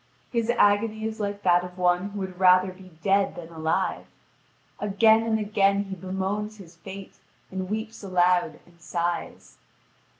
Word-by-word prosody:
His 235 -1 -1
agony 220 -1 +2
is 220 +1 -4
like 205 -1 -3
that 175 -1 +4
of 180 0 -9
one 180 +2 +2
who 200 0 -6
would 185 -1 -6
rather 185 0 +5
be 185 0 -14
dead 195 0 +2
than 170 -2 -9
alive. 160 -1 -1 0.7
Again 220 +2 +4
and 225 -1 0
again 200 -1 +2
he 195 -1 -6
bemoans 190 +4 -3
his 175 -4 -14
fate, 195 +2 -10 0.3
and 185 0 -4
weeps 220 +1 -4
aloud 180 -2 +2
and 170 -1 -23
sighs. 170 0 -4
195 Hz, 155 wpm, -26 LUFS, 180-210 Hz, 0.7 s, rather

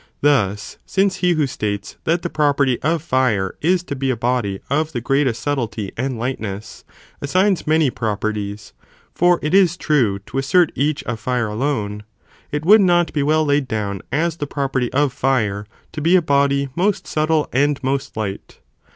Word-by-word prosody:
Thus, 105 -9 +1
since 195 -1 0
he 180 -2 +2
who 155 -3 +1
states 105 -6 -4
that 170 +1 +1
the - - 0
property 140 -4 +1
of 160 +1 0
fire 125 - +1
is 175 +3 +2
to 140 - -5
be 135 0 -2
a 130 - +1
body 115 -5 -1
of 155 +3 -1
the 120 - -1
greatest 130 -1 0
subtlety 115 -8 -2
and 130 0 -2
lightness, 110 -4 -5 0.4
assigns 185 +6 +1
many 155 -3 +3
properties, 105 -2 -3 0.4
(for 175 0 +3
it 150 - -1
is 185 -3 +4
true) 125 - +1
to 135 - -3
assert 165 +5 +3
each 145 +1 -1
of 120 -2 -4
fire 120 0 -1
alone, 105 -3 -2 0.5
it 150 +1 -3
would 210 +4 +7
not 175 -2 +3
be 145 - 0
well 155 +2 +2
laid 145 -2 +1
down 100 -4 -3
as 165 +2 0
the 145 - -4
property 135 -4 -2
of 140 -1 +1
fire 105 -7 0 0.2
to 155 - -6
be 170 +4 +4
a 185 - +5
body, 140 -1 +2
most 195 +3 0
subtle 155 0 +1
and 145 +2 +2
most 135 -2 -2
light. 100 -3 -5
140 Hz, 175 wpm, -20 LUFS, 115-155 Hz, 0.5 s, would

